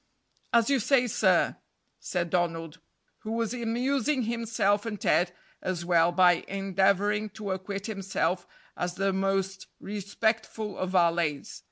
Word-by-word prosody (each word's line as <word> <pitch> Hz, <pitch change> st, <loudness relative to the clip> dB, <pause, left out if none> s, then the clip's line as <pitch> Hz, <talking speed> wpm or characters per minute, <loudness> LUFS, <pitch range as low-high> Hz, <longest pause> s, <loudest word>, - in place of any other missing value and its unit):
"As 230 Hz, -1 st, +4 dB
you 275 Hz, -, +3 dB
say, 250 Hz, +2 st, +3 dB
sir," 240 Hz, -, +2 dB, 0.4 s
said 175 Hz, -2 st, -2 dB
Donald, 165 Hz, -2 st, -1 dB, 0.4 s
who 220 Hz, -, -5 dB
was 230 Hz, 0 st, -1 dB
amusing 255 Hz, +4 st, 0 dB
himself 220 Hz, -3 st, 0 dB
and 215 Hz, -3 st, -5 dB
Ted 175 Hz, +3 st, +2 dB, 0.3 s
as 175 Hz, -2 st, -3 dB
well 170 Hz, -1 st, +4 dB
by 180 Hz, -1 st, +4 dB
endeavoring 195 Hz, +2 st, +1 dB
to 210 Hz, -3 st, -4 dB
acquit 195 Hz, +1 st, -4 dB
himself 190 Hz, -4 st, -2 dB, 0.3 s
as 175 Hz, 0 st, -3 dB
the 195 Hz, +1 st, 0 dB
most 195 Hz, 0 st, -1 dB
respectful 215 Hz, +1 st, -2 dB
of 185 Hz, -, -3 dB
valets. 170 Hz, -5 st, +1 dB
195 Hz, 130 wpm, -28 LUFS, 180-220 Hz, 0.4 s, As